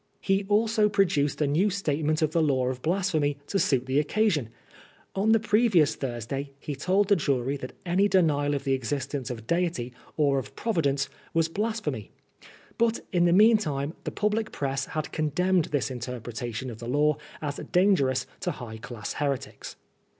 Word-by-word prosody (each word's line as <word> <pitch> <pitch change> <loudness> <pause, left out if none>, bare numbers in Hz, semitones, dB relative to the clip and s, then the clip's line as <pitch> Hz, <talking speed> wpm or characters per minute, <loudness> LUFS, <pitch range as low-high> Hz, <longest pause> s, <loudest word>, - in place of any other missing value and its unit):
He 195 0 +1
also 215 0 +3
produced 150 -8 +1
a - - +3
new 160 +9 +2
statement 155 -5 0
of 155 - +1
the 165 - +2
Law 130 -4 +2
of 130 -1 -5
Blasphemy 160 -4 0
to 195 - -1
suit 130 -7 +2
the 130 +2 +2
occasion. 155 - +1 0.6
On 205 +3 +2
the 225 - +5
previoas 210 -7 +3
Thursday 135 +2 -4
he 145 - -5
told 185 +8 +2
the 200 - +5
jury 140 -4 0
that 130 -1 -8
any 185 +3 +3
denial 145 -7 +2
of 140 - -3
the 135 -1 +2
exis 130 +1 -2
tence 140 -3 -4
of 115 -3 -6
Deity 165 -7 -1 0.2
or 140 -3 +3
of 125 - -9
Providence 140 -11 0 0.3
was 165 0 +2
blasphemy. 200 - -3 0.7
But 230 0 +2
in 175 -3 +3
the 170 - +4
meantime 175 -8 +3
the - - -2
public 215 +1 -1
press 135 -1 -2
had 155 -1 -4
condemned 170 +3 +1
this 135 -5 -1
interpretation 120 0 -5
of 110 - -10
the 120 - -7
law 150 +2 +2 0.2
as 145 -2 -4
dangerous 140 -9 +3
to - - -2
high 115 -3 -8
class 110 -2 -6
heretics. 140 -3 -3
150 Hz, 170 wpm, -27 LUFS, 135-190 Hz, 0.7 s, the